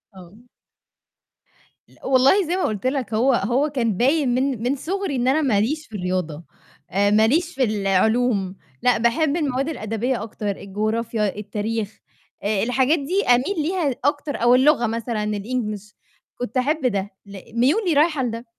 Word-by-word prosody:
آه. 185 +4 -14 1.5
لأ، - - -18
والله 270 +8 +4
زي 345 - 0
ما 370 - -1
قُلت 215 +2 -1
لك، 260 -5 -2
هو 255 +5 +3
هو 245 +7 +1
كان 230 -8 -1
باين 275 +3 +2
من 260 -3 -1
من 255 +3 +1
صُغري 370 +2 -3
إن 250 0 0
أنا 280 +4 +3
ما 235 -9 +2
ليش 300 +8 -1
في 220 - -11
الرياضة، 180 -4 -3 0.5
آآ 205 +2 +2
ما 220 +1 +4
ليش 330 +6 +1
في 265 - +1
العلوم، 205 0 +1 0.3
لأ، 250 - +3
باحب 280 +7 +1
المواد 275 -2 -1
الأدبية 230 -2 -2
أكتر، 210 -1 -5
الجغرافيا، 215 +1 -2
التاريخ، 210 +1 -4 0.4
آآ 205 0 0
الحاجات 260 +6 +2
دي 360 +9 -1
أميل 250 +11 +3
ليها 315 -5 -1
أكتر 290 0 0
أو 240 +1 +5
اللغة 260 -2 +4
مثلًا 230 -1 -3 0.2
الEnglish، 215 -4 -4 0.4
كنت 245 0 -4
أحب 285 +3 0
ده، 200 -3 -2 0.2
لأ، 200 -1 -10
ميولي 315 - +2
رايحة 300 -2 +2
لده، 230 0 -4
245 Hz, 160 wpm, -22 LUFS, 210-280 Hz, 1.5 s, أو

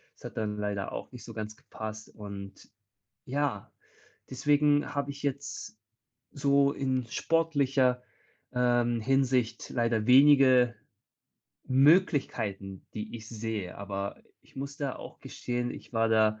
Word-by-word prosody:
Das - - -16
hat - - -8
dann 105 -1 -2
leider 100 -1 -3
auch - - -6
nicht 125 -2 -10
so 115 - -9
ganz 110 0 -5
gepasst 110 0 -8
und 100 -2 -9 0.6
ja, 135 -6 -2 0.6
deswegen 145 +2 +2
habe 140 0 -1
ich 140 0 -9
jetzt 140 -5 -4 0.5
so 140 0 +3
in 130 -3 -1
sportlicher, 140 -5 +1 0.5
ähm, 120 -1 +2
Hinsicht 125 -2 +1
leider 115 -3 0
wenige 130 -2 +6 0.9
Möglichkeiten, 130 - +2
die 110 +2 -5
ich 110 -1 -11
sehe, 110 -5 -4
aber 100 0 -4
i - - -25 0.2
ich - - -24
muss 140 +1 -5
da 140 -3 -3
auch - - -11
gestehen, 120 0 -3
ich - - -10
war 115 -1 +2
da 110 -1 +3
125 Hz, 130 wpm, -29 LUFS, 110-140 Hz, 0.9 s, wenige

